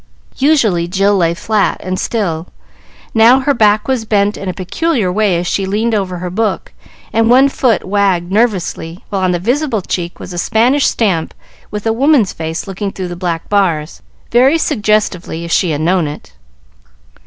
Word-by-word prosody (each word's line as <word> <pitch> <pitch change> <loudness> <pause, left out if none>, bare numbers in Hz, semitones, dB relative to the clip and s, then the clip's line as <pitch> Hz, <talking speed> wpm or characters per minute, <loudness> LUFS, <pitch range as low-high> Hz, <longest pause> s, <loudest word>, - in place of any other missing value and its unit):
Usually, 230 - +2
Jill 195 +3 +2
lay 170 -3 +1
flat 210 +2 0
and 185 0 -3
still; 175 -8 -2 0.7
now 235 +4 +5
her 285 +2 +1
back 215 -3 +2
was 260 -4 0
bent 205 -1 +1
in 195 - -5
a - - 0
peculiar 200 - -1
way 200 -2 +1
as 175 - -2
she 195 +2 -1
leaned 220 +4 0
over 190 -4 -1
her 180 0 -5
book, 210 0 -2 0.4
and 225 0 +2
one 265 +3 +5
foot 245 -7 +1
wagged 190 -3 0
nervously, 190 -5 -1
while 195 -2 -2
on 185 - +1
the 180 - +1
visible 240 - -1
cheek 175 -1 -4
was 180 - -8
a 175 - -3
Spanish 245 +10 +2
stamp 185 -8 0 0.3
with 210 0 -6
a 225 - +2
woman's 265 -4 +3
face 160 0 -4
looking 195 +1 -4
through 185 -2 -5
the 175 - -5
black 170 -2 -3
bars, 170 -7 0 0.3
very 260 +6 +4
suggestively, 210 - -1
if 170 - -7
she 180 - +2
had 150 -1 -1
known 175 0 +1
it. 145 - -9
200 Hz, 175 wpm, -15 LUFS, 175-225 Hz, 0.7 s, now